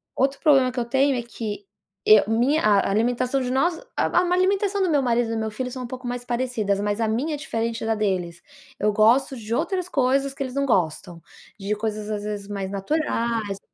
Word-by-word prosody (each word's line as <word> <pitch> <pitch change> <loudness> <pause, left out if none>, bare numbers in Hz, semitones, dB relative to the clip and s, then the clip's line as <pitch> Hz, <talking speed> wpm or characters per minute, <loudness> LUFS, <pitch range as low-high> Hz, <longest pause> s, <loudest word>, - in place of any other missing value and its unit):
outro 270 +1 +1
problema 270 -5 +4
que 250 - -4
eu 235 - -1
tenho 270 +3 +2
é 240 - -1
que 210 -3 -6 0.4
eu 215 -1 +8
minha 245 +8 +2
a 205 -2 +3
alimentação 245 +5 +1
de 250 0 -2
nós, 330 +6 +1 0.2
a - - +2
a 355 0 +2
alimentação 390 +2 +1
do 370 - +2
meu 290 -3 +3
marido 240 -2 +1
e - - -1
do - - -1
meu 220 -1 -2
filho 250 +3 -4
são 255 0 -6
um 245 - -5
pouco 255 0 -7
mais 245 0 -4
parecidas, 235 -5 -1
mas 205 +2 -1
a 220 - +2
minha 255 +9 -1
é - - -5
diferente 230 -5 -3
da 225 0 +1
deles. 180 -5 -2 0.4
Eu 210 0 +1
gosto 245 +6 +3
de 225 -1 -5
outras 360 +5 -1
coisas 275 0 +1
que 275 - -11
eles 255 -1 -6
não 280 0 +1
gostam, 175 - -1 0.4
de 200 +2 -2
coisas 215 0 -4
às 205 -1 -3
vezes 205 -1 -5
mais 195 -2 -4
naturais, 225 -3 -1
235 Hz, 220 wpm, -23 LUFS, 210-270 Hz, 0.4 s, eu